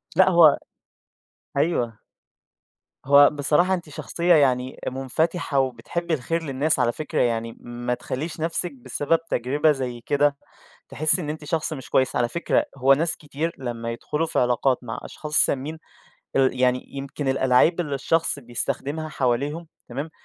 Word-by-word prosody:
لأ، 190 +2 +6
هو 170 -4 +7 1.0
أيوه. 130 -7 0 1.1
هو 140 +1 +7
بصراحة 150 +5 +2
أنتِ 170 -4 -3
شخصية 170 +4 0
يعني 130 -3 +2
منفتحة، 140 +4 -1
وبتحبي 160 +6 -2
الخير 165 +4 -1
للناس 145 +2 0
على 120 - +3
فكرة 155 +4 -2
يعني 115 -1 -1
ما 120 0 -4
تخلّيش 150 +6 -5
نَفسِك 165 +2 -1
بسبب 140 +5 -1
تجربة 145 +6 +2
زي 125 -4 -4
كده، 145 0 +2 0.5
تحسي 155 +4 +1
إن 150 -3 -4
أنتِ 155 0 -6
شخص 160 +1 -2
مش 135 -4 -7
كويس 130 -1 +2
على 120 -1 +2
فكرة 170 +6 +1
هو 135 +1 +5
ناس 160 +4 0
كتير 150 +2 -4
لمّا 115 -2 -4
يدخلوا 150 +7 -2
في - - -2
علاقات 125 +1 +2
مع 115 -2 -5
أشخاص 150 -1 -8
سامين 145 +4 +2 0.6
ال 130 -1 +2
يعني 125 0 +2
يمكن 140 +1 -5
الألاعيب 130 +6 +3
اللي 150 -5 -2
الشخص 160 +3 0
بيستخدمها 140 +5 -3
حواليهم، 140 +4 -1 0.2
تمام؟ 140 +6 -5
140 Hz, 145 wpm, -24 LUFS, 125-160 Hz, 1.1 s, هو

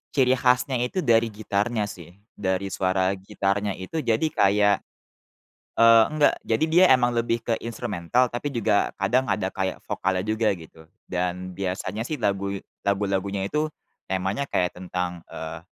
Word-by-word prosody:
ciri 130 -3 +4
khasnya 125 +1 +2
itu 125 +10 -1
dari 115 -2 +4
gitarnya 105 +1 -1
sih, 90 -4 -8 0.2
dari 95 0 -2
suara 95 0 +1
gitarnya 100 +1 -2
itu 95 +12 -5
jadi 120 +2 +1
kayak, 100 -1 +4 1.0
eee, 115 -1 +7
enggak, 155 -1 +3
jadi 115 +8 +1
dia 180 +2 +7
emang 125 -2 +4
lebih 115 0 -1
ke 115 - +1
instrumental, 115 +1 -1
tapi 120 +4 -2
juga 115 -6 +1
kadang 125 +7 +1
ada 95 -2 -1
kayak 95 -1 -2
vokalnya 95 0 -1
juga 110 0 +1
gitu, 80 -1 -15 0.2
dan 90 0 -3
biasanya 95 +2 -3
sih 150 +6 -3
lagu 100 -3 -1 0.2
lagu-lagunya 100 -1 -1
itu 150 +9 -1 0.4
temanya 95 +8 -1
kayak 90 0 0
tentang, 90 -1 -4
eee, 80 +1 -6
100 Hz, 145 wpm, -25 LUFS, 95-120 Hz, 1.0 s, eee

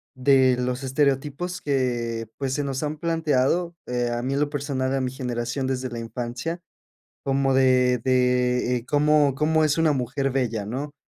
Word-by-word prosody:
de 130 -1 +4
los 125 +1 -2
estereotipos 145 +6 -1
que 120 -5 -1
pues, 135 -2 -2
se 145 - -1
nos 135 +1 -3
han 150 +1 -3
planteado, 165 +1 0
eh, 120 -1 -1
a 120 0 -2
mí 135 +2 -1
en 140 - 0
lo 145 - +1
personal, 135 -2 -2
a 135 - +1
mi 130 -1 -1
generación 125 0 -3
desde 130 -1 -2
la 120 -1 -6
infancia 120 +8 -4 0.6
como 135 -1 +1
de 130 -2 +4
de, 125 -1 +2
eh, 120 - -8
cómo 145 -1 +3
cómo 155 +2 +2
es 150 +1 +2
una 160 -2 +3
mujer 135 +1 -1
bella, 120 -6 -1
¿no?, 140 +6 -5
130 Hz, 175 wpm, -24 LUFS, 125-145 Hz, 0.6 s, de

